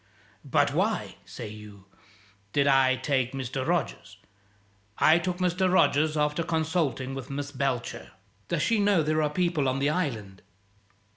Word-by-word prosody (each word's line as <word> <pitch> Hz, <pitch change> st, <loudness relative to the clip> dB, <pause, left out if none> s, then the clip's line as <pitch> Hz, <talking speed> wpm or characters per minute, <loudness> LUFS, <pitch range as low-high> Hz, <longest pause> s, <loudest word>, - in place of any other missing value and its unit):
But -, -, +1 dB
why -, -, -1 dB
(say 120 Hz, -, -8 dB
you) 105 Hz, -2 st, -12 dB, 0.7 s
did 140 Hz, -, +2 dB
I 135 Hz, -2 st, +4 dB
take 130 Hz, -1 st, -1 dB
Mr. 130 Hz, 0 st, -3 dB
Rogers? 135 Hz, -, -2 dB, 0.8 s
I 160 Hz, +2 st, +5 dB
took 180 Hz, +1 st, -3 dB
Mr. 180 Hz, 0 st, +1 dB
Rogers, 155 Hz, -4 st, +3 dB
after 150 Hz, +2 st, +1 dB
consulting 160 Hz, -5 st, -1 dB
with 135 Hz, 0 st, -7 dB
Miss 140 Hz, +1 st, -4 dB
Belcher 130 Hz, -3 st, -3 dB, 0.2 s
" 100 Hz, -1 st, -38 dB
"Does 170 Hz, -3 st, 0 dB
she 225 Hz, +2 st, +2 dB
know 200 Hz, -5 st, +3 dB
there 155 Hz, +1 st, +1 dB
are 150 Hz, -, +1 dB
people 165 Hz, -4 st, 0 dB
on 130 Hz, -, -1 dB
the 140 Hz, +2 st, +1 dB
island?" 110 Hz, -, -3 dB
145 Hz, 150 wpm, -27 LUFS, 130-165 Hz, 0.8 s, I